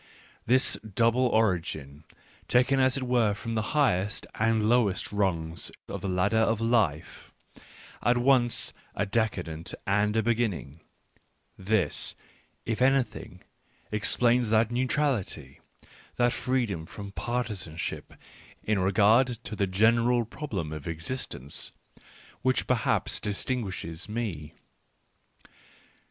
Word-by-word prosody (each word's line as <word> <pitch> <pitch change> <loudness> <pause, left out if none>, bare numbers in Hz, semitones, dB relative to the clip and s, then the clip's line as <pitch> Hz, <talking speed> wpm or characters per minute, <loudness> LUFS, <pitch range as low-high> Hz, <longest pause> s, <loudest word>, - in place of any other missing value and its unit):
This 130 +2 +2
double 115 +4 +2
origin, 80 - -1 0.4
taken 130 +2 +3
as 130 0 +3
it 135 - -3
were 120 -5 +2
from 115 +3 -5
the 110 - +1 0.2
highest 105 -8 +1
and 110 -1 +1
lowest 110 -5 +2
rungs 85 -5 -1 0.2
of - - -5
the 100 - -3
ladder 95 +4 +2
of 110 0 +2
life, 115 -10 0 0.7
at 120 +1 +3
once 120 -1 +3 0.2
a 100 - 0
decadent 95 -7 -2
and 105 +2 +2
a 110 - +2
beginning, 110 - -1 0.8
this, 95 0 0 0.5
if 115 +1 -2
anything, 135 0 0 0.5
ex 105 0 +1
plains 120 -1 +3
that 110 +1 +3
neutrality, 120 - -1 0.6
that 120 0 +2
freedom 115 -13 -1
from 100 -1 -8
partisan 105 -8 -3
ship - - -5 0.5
in 105 -2 +1
regard 105 +6 +4 0.2
to 110 - -6
the 100 -1 0
general 115 +5 +3
problem 105 - -5
of 75 0 -7
existence, 80 - -4 0.7
which 130 0 +1
perhaps 120 -5 0
distinguishes 100 -5 -3
me. 100 -10 -4
110 Hz, 115 wpm, -28 LUFS, 95-120 Hz, 0.8 s, regard